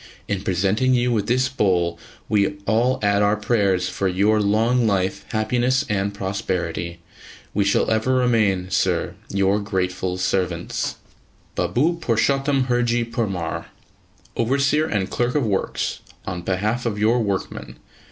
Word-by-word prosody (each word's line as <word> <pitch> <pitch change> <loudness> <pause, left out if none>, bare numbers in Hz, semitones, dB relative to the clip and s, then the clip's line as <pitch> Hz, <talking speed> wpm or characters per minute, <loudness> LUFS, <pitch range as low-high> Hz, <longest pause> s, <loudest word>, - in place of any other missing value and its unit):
In 100 -2 -1
presenting 100 +9 +1
you 125 0 +2
with 110 -4 0
this 130 +2 +2
bowl, 90 -10 +1 0.3
we 100 -2 +2
all 120 +5 +2
add 100 0 +3
our 105 +1 +3
prayers 100 -5 +1
for 95 - -1
your 100 +4 +2
long 115 +4 +2
life, 95 -2 0
happiness 125 +5 +1
and 100 -1 0
prosperity. 95 -4 -3 0.6
We 100 -1 +1
shall 100 - +2
ever 110 +4 +2
remain, 105 -7 +2
Sir, - - +1 0.2
Your 100 +1 +2
grateful 95 -2 -2
servants, 90 -2 -1 0.6
Baboo 125 - +1
PURSHOTAM 135 +3 +2
HURJEE 120 -1 +1
PURMAR, 95 -8 -2 0.7
Overseer 140 +6 +2
and 100 -7 -1
Clerk 120 +4 -1
of 145 -5 +2
Works, 100 -3 -1 0.3
on 90 -1 -4
behalf 105 +7 -1
of 105 -3 -2
your 115 +4 +3
Workmen. 100 -3 -3
105 Hz, 130 wpm, -22 LUFS, 95-120 Hz, 0.7 s, add